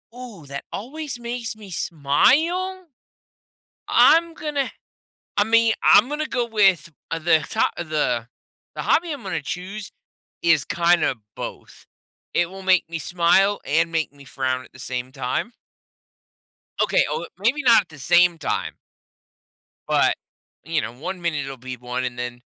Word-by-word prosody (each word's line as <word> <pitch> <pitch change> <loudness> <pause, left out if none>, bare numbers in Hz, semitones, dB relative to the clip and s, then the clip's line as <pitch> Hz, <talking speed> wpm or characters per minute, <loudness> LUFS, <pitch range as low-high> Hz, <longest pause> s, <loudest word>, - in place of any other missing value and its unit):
Ooh, 230 - -10
that 140 0 -6
always 275 +3 -5
makes 235 -1 -4
me 210 -2 -12
smile? 320 - +1 1.0
I'm 335 +1 +5
gonna 295 -4 -2 0.7
I 205 - +4
mean, 230 +1 +4
I'm 220 +5 +6
gonna 300 +1 -2
go 245 -4 -1
with 195 -7 +3 0.2
the 165 -1 +2
top - - +1
the 150 -8 -1 0.5
the - - -4
hobby 335 -1 +2
I'm 285 -4 -7
gonna 190 -4 -3
choose 190 +7 -6 0.5
is 165 -4 +4
kinda 170 -4 +2 0.2
both. - - -8 0.5
It 175 0 +2
will 195 0 -9
make 185 -2 +4
me 165 0 -4
smile, 180 +5 +2
and 165 +3 +1
make 160 -4 -1
me 140 -1 -16
frown 130 -1 -2
at - - -19
the - - -16
same 125 0 -4
time. 130 - -3 1.3
Okay. - - +3
Oh, - - -3
maybe 235 +10 +1
not 235 -4 +7
at 185 - -17
the 155 -2 -13
same 175 +4 +4
time 160 - -2 1.2
but, - - +4 0.5
you 160 0 0
know, - - -5
one 180 +9 -6
minute 165 -5 -1
it'll 135 -1 -7
be 130 +1 -7
one, 125 +1 -4
and 125 -1 -4
then 125 0 -5
175 Hz, 150 wpm, -23 LUFS, 145-230 Hz, 1.3 s, not